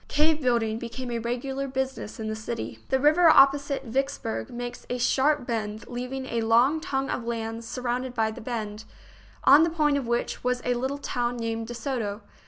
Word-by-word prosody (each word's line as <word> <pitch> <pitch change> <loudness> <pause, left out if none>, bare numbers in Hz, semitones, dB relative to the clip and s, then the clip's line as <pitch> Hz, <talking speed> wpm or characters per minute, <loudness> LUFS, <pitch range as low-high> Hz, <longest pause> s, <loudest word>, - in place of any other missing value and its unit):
Cave 305 +1 +2
building 230 -4 +1
became 240 +1 -5
a 235 - -1
regular 265 +4 -3
busi 265 0 -2
ness 210 - -8
in 220 - -3
the 215 - -2
city. 220 +2 -5
The 265 - +2
river 310 +5 +6
opposite 280 -1 +5
Vicksburg 235 - -2
makes 245 0 -6
a 250 - -1
sharp 265 +3 +2
bend, 220 -2 -3
leaving 250 +2 -4
a 235 -3 -1
long 240 +7 +4
tongue 270 -5 -2
of 240 - -2
land 230 -1 -3
surrounded 250 +1 -3
by 220 -1 +1
the - - -9
bend, 220 -2 -4 0.6
on 285 +3 +8
the 330 - +4
point 300 -3 +2
of 255 - -5
which 235 0 -1
was 250 0 +1
a 245 - +2
little 265 +3 -2
town 245 -3 -2
named 225 -1 -3
De 240 - -6
Soto. 230 -4 -3
245 Hz, 190 wpm, -26 LUFS, 230-270 Hz, 0.6 s, on